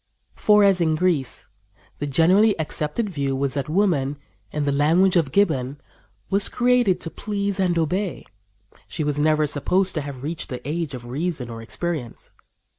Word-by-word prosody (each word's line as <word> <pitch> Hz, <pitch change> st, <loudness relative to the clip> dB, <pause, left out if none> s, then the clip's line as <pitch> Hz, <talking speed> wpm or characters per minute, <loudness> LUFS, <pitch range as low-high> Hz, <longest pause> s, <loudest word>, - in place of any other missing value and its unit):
For, 210 Hz, -1 st, +4 dB
as 195 Hz, -3 st, +4 dB
in 160 Hz, -2 st, +2 dB
Greece, 155 Hz, -6 st, -1 dB, 0.5 s
the 145 Hz, -, -2 dB
generally 185 Hz, +8 st, +4 dB
accepted 155 Hz, +7 st, -1 dB
view 140 Hz, -7 st, -2 dB
was 135 Hz, 0 st, -1 dB
that 140 Hz, 0 st, -3 dB
woman, 155 Hz, -6 st, +1 dB, 0.3 s
in 150 Hz, -1 st, -2 dB
the 140 Hz, -, +1 dB
language 165 Hz, +7 st, +3 dB
of 160 Hz, -6 st, +2 dB
Gibbon, 140 Hz, -8 st, +1 dB, 0.5 s
"was 200 Hz, +1 st, +3 dB
created 245 Hz, -6 st, +2 dB
to 165 Hz, -, -3 dB
please 200 Hz, -1 st, -3 dB
and 180 Hz, -3 st, +1 dB
obey. 180 Hz, +4 st, -1 dB, 0.6 s
She 160 Hz, -, -4 dB
was 145 Hz, -1 st, -1 dB
never 155 Hz, 0 st, +3 dB
supposed 180 Hz, +7 st, +1 dB
to 155 Hz, -, -2 dB
have 140 Hz, -2 st, -8 dB
reached 160 Hz, +2 st, -4 dB
the 125 Hz, 0 st, -6 dB
age 155 Hz, -2 st, -3 dB
of 120 Hz, -1 st, -9 dB
reason 135 Hz, -1 st, -3 dB
or 115 Hz, 0 st, -7 dB
experience." 140 Hz, 0 st, -5 dB
155 Hz, 165 wpm, -23 LUFS, 140-185 Hz, 0.6 s, For